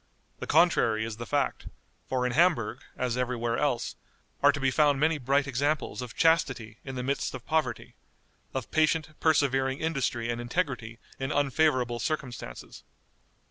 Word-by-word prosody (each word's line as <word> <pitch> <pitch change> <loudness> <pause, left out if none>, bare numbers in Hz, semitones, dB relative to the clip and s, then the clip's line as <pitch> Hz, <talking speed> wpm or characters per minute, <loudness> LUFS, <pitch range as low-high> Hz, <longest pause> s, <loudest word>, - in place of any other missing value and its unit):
The - - -6
contrary 130 -10 +3
is 110 -1 -6
the 120 - -6
fact; 145 -1 -1 0.4
for 125 -1 0
in 125 - 0
Hamburg, 135 -7 +2 0.2
as 125 -1 -1
every 125 0 0
where 120 0 -1
else, 125 -5 0 0.5
are 145 - +7
to 145 - -5
be 135 -1 +2
found 145 0 +3
many 155 +1 +2
bright 140 +2 +2
examples 140 +1 -1
of 125 -2 -7
chastity 130 -9 +1
in 135 -1 -6
the 125 - -3
midst 140 0 -1
of 125 - -9
poverty; 160 -1 -1 0.6
of 130 -4 -5
patient, 155 0 +2
persevering 135 -4 +2
industry 135 -7 -1
and 120 0 -3
integrity 120 -4 -2 0.2
in 135 +2 -2
unfavorable 135 -4 +1
circumstances. 125 - -5
135 Hz, 155 wpm, -28 LUFS, 120-150 Hz, 0.6 s, are